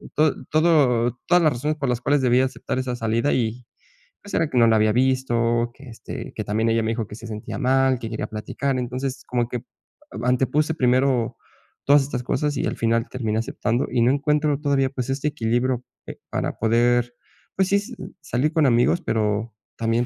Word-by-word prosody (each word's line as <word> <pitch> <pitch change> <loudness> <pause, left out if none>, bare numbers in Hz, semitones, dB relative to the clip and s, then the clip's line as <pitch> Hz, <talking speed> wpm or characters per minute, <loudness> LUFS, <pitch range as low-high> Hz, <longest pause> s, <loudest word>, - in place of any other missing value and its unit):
tod 150 -4 +1
todo 130 -7 +3
todas 175 -1 +4
las 155 - +4
razones 150 +5 -2
por 140 -4 -2
las 125 0 -1
cuales 145 +1 +2
debía 125 +1 +3
aceptar 130 - -4
esa 125 -1 -2
salida 115 +4 0
y, 120 0 -1 0.6
pues, 205 - -11
era 160 - +1
que 130 - -2
no 115 - +6
la 110 - +4
había 110 0 +3
visto 120 -2 +1
que, 135 -2 -14
este, 115 - -8
que - - -3
también 110 +2 0
ella 115 0 +2
me 110 - 0
dijo 115 -1 -2
que 105 - -9
se 115 - -10
sentía 105 +3 -6
mal, 130 -1 +2
que 115 -2 -5
quería 110 -1 -3
platicar. 130 +5 -3
Entonces, 130 +2 -4
como 120 -1 0
que 125 - -2 0.5
a 110 +5 -4
antepuse 135 +5 +1
primero 125 -3 +2 0.5
todas 145 +1 +6
estas 130 -3 -4
cosas 145 +3 -1
y - - -1
al - - -3
final 115 0 +1
terminé 110 -4 -2
aceptando, 115 +2 -1
y 125 -1 +1
no 120 - +4
encuentro 150 0 +1
todavía, 140 -2 +1
pues, 130 -1 -5
este 140 +2 -1
equilibrio, 120 0 -1 0.2
eh, - - -8
para - - -3
poder, 120 +2 +2 0.4
pues, 190 -1 +1
sí, 200 - +3
s 200 - -5 0.3
salir 145 +2 -1
con 160 -3 +3
amigos, 120 +8 +3
pero 110 - -1 0.2
también, 115 +1 +1
125 Hz, 200 wpm, -23 LUFS, 115-140 Hz, 0.6 s, no